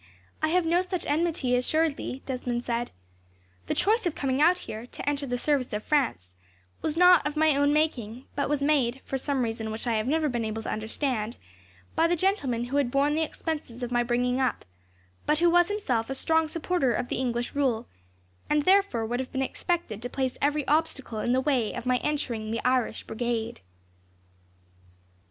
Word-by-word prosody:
"I 310 Hz, -, +3 dB
have 350 Hz, +2 st, +2 dB
no 340 Hz, +2 st, +3 dB
such 365 Hz, -1 st, -3 dB
enmity, 305 Hz, -5 st, +1 dB
assuredly," 280 Hz, 0 st, 0 dB
Desmond 250 Hz, -2 st, -2 dB
said. 240 Hz, 0 st, -2 dB, 0.8 s
"The -, -, -1 dB
choice 435 Hz, 0 st, +2 dB
of 325 Hz, -, -2 dB
coming 270 Hz, 0 st, 0 dB
out 350 Hz, +4 st, +5 dB
here, 225 Hz, -8 st, -7 dB
to -, -, -8 dB
enter 285 Hz, -1 st, 0 dB
the 245 Hz, 0 st, -1 dB
service 270 Hz, -2 st, 0 dB
of 210 Hz, 0 st, -2 dB
France, 235 Hz, -, 0 dB, 0.5 s
was 310 Hz, 0 st, -2 dB
not 360 Hz, 0 st, +7 dB
of 295 Hz, -, -4 dB
my 315 Hz, -2 st, +4 dB
own 285 Hz, +1 st, +3 dB
making; 255 Hz, -6 st, -1 dB
but 280 Hz, -1 st, -1 dB
was 290 Hz, -1 st, 0 dB
made, 270 Hz, -4 st, +2 dB
for 270 Hz, -, -2 dB
some 270 Hz, -1 st, 0 dB
reason 225 Hz, -1 st, -3 dB
which 220 Hz, +3 st, -4 dB
I 235 Hz, -, +1 dB
have 215 Hz, +2 st, -1 dB
never 310 Hz, +2 st, +2 dB
been 240 Hz, -4 st, -1 dB
able 220 Hz, 0 st, -3 dB
to -, -, -3 dB
understand, 220 Hz, +1 st, -2 dB, 0.6 s
by 330 Hz, -, +4 dB
the 350 Hz, -, +2 dB
gentleman 310 Hz, -, 0 dB
who 255 Hz, +4 st, -2 dB
had 280 Hz, -4 st, +2 dB
borne 280 Hz, +3 st, +2 dB
the 315 Hz, -, +1 dB
expenses 300 Hz, -6 st, -4 dB
of 245 Hz, -, -3 dB
my 240 Hz, 0 st, +3 dB
bringing 245 Hz, +1 st, +1 dB
up, 260 Hz, -3 st, 0 dB, 0.6 s
but 300 Hz, -, +3 dB
who 340 Hz, +1 st, +4 dB
was 350 Hz, 0 st, +5 dB
himself 265 Hz, -, -1 dB
a 270 Hz, -, -2 dB
strong 320 Hz, +3 st, +2 dB
supporter 320 Hz, -5 st, 0 dB
of 245 Hz, -, -2 dB
the -, -, -1 dB
English 240 Hz, -2 st, -2 dB
rule, 250 Hz, -5 st, 0 dB, 0.6 s
and 300 Hz, 0 st, +3 dB
therefore 375 Hz, -, +3 dB
would 240 Hz, +2 st, -2 dB
have 260 Hz, -, -4 dB
been 265 Hz, -1 st, 0 dB
expected 265 Hz, -, -2 dB
to 245 Hz, -, -4 dB
place 260 Hz, 0 st, -2 dB
every 290 Hz, 0 st, +1 dB
obstacle 290 Hz, -7 st, 0 dB
in 240 Hz, -, 0 dB
the 260 Hz, +1 st, +3 dB
way 255 Hz, -6 st, +1 dB
of -, -, -6 dB
my 250 Hz, 0 st, +3 dB
entering 245 Hz, -7 st, -2 dB
the 230 Hz, +1 st, -3 dB
Irish 255 Hz, -2 st, +1 dB
Brigade." 235 Hz, 0 st, -3 dB
265 Hz, 195 wpm, -27 LUFS, 240-310 Hz, 0.8 s, not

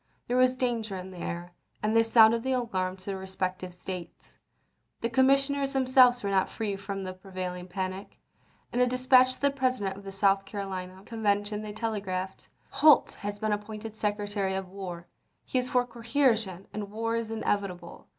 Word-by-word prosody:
There 245 Hz, -, 0 dB
was 255 Hz, 0 st, +4 dB
danger 235 Hz, -5 st, -1 dB
in 185 Hz, +1 st, -7 dB
the 180 Hz, -, -10 dB
air, 175 Hz, +1 st, -5 dB, 0.3 s
and 215 Hz, +1 st, +1 dB
they 225 Hz, -, +7 dB
sounded 225 Hz, 0 st, +6 dB
the 260 Hz, +2 st, 0 dB
alarm 190 Hz, -7 st, -1 dB
to 185 Hz, -, -18 dB
their 195 Hz, -1 st, -3 dB
respective 185 Hz, -1 st, -3 dB
States. 180 Hz, -1 st, -8 dB, 0.7 s
The 230 Hz, -, -1 dB
commissioners 275 Hz, +2 st, +3 dB
themselves 255 Hz, -2 st, +5 dB
were 200 Hz, -, -1 dB
not 190 Hz, -1 st, +2 dB
free 210 Hz, -3 st, -3 dB
from 195 Hz, 0 st, -5 dB
the 185 Hz, 0 st, -5 dB
prevailing 185 Hz, -1 st, -6 dB
panic. 185 Hz, +1 st, -5 dB, 0.6 s
In 245 Hz, -, 0 dB
a 250 Hz, -, +5 dB
dispatch 255 Hz, +1 st, +5 dB
to -, -, -21 dB
the 280 Hz, 0 st, +3 dB
President 255 Hz, -8 st, 0 dB
of 200 Hz, -, -11 dB
the 195 Hz, -, -7 dB
South 195 Hz, 0 st, +3 dB
Caro 200 Hz, 0 st, -5 dB
lina 185 Hz, 0 st, -6 dB
Convention 210 Hz, -2 st, 0 dB
they 215 Hz, -1 st, -6 dB
telegraphed: 195 Hz, -4 st, -4 dB
" -, -, -36 dB
Holt 305 Hz, -3 st, +6 dB
has 205 Hz, 0 st, -4 dB
been 215 Hz, 0 st, 0 dB
appointed 215 Hz, +1 st, -6 dB
Secretary 205 Hz, -2 st, -1 dB
of 190 Hz, -1 st, -4 dB
War. 180 Hz, -3 st, -7 dB, 0.4 s
He 255 Hz, -, 0 dB
is 250 Hz, 0 st, -2 dB
for 250 Hz, -1 st, +2 dB
coercion, 230 Hz, -6 st, 0 dB
and 205 Hz, -1 st, -4 dB
war 225 Hz, +2 st, -2 dB
is 230 Hz, -1 st, -2 dB
inevitable. 200 Hz, -6 st, -3 dB
205 Hz, 180 wpm, -28 LUFS, 190-240 Hz, 0.7 s, they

